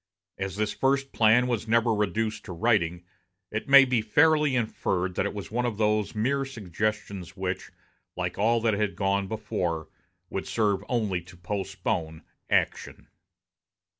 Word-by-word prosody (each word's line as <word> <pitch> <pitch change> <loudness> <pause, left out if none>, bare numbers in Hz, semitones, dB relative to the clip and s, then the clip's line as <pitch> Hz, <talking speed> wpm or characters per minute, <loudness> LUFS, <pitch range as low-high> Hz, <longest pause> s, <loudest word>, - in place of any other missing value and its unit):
As 95 -1 -3
this 105 0 -1
first 135 0 +1
plan 115 +2 +4
was 120 -3 -2
never 115 0 +3
reduced 110 +1 -1
to 90 - -6
writing, 90 -4 +1 0.5
it 110 +5 -4
may 140 0 +9
be 125 -3 +1
fairly 150 +5 +3
inferred 95 -6 -1
that - - 0
it - - -5
was 100 0 -7
one 120 +2 0
of 120 -4 -2
those 105 0 +1
mere 135 +6 +1
suggestions 105 -5 -4
which, 95 0 -3 0.5
like - - -2
all 115 +3 +2
that 115 -1 +2
had 100 -2 -1
gone 100 +1 0
before, 90 -7 -3 0.4
would - - -3
serve 105 -3 +1
only 105 -7 0
to 90 +1 -15
postpone 90 -4 -3 0.3
action. - - -1
105 Hz, 150 wpm, -27 LUFS, 95-115 Hz, 0.5 s, may